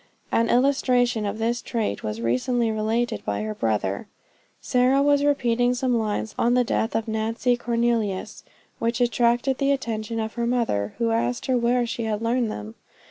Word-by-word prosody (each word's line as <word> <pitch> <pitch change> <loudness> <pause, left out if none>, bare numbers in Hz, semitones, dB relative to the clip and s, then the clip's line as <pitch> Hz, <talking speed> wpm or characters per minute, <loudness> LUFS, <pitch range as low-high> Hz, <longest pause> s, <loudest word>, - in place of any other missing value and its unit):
An 230 0 +2
illustration 245 -4 +2
of 200 +2 -3
this 230 +1 -1
trait 220 - -2
was 105 +1 -4
recently 220 - +1
related 220 +2 -1
by 105 0 -2
her 110 0 -3
brother. 105 -3 -1 0.5
Sarah 255 +2 +2
was 285 0 +3
repeating 245 -4 +2
some 250 -1 0
lines 215 -1 -2
on 240 +1 +3
the 250 - +4
death 225 -1 -1
of 225 +1 -1
Nancy 225 +3 0
Cornelius, 235 -4 -1 0.4
which 230 0 -1
attracted 240 +2 +2
the 275 0 +2
attention 230 -4 -2
of 220 0 -3
her 235 -1 -2
mother, 230 - 0
who 230 -1 +1
asked 230 +1 -1
her 260 - +1
where 240 0 +2
she 235 -1 -3
had 215 -1 -1
learned 235 0 +1
them. 105 +1 -7
235 Hz, 170 wpm, -24 LUFS, 220-245 Hz, 0.5 s, the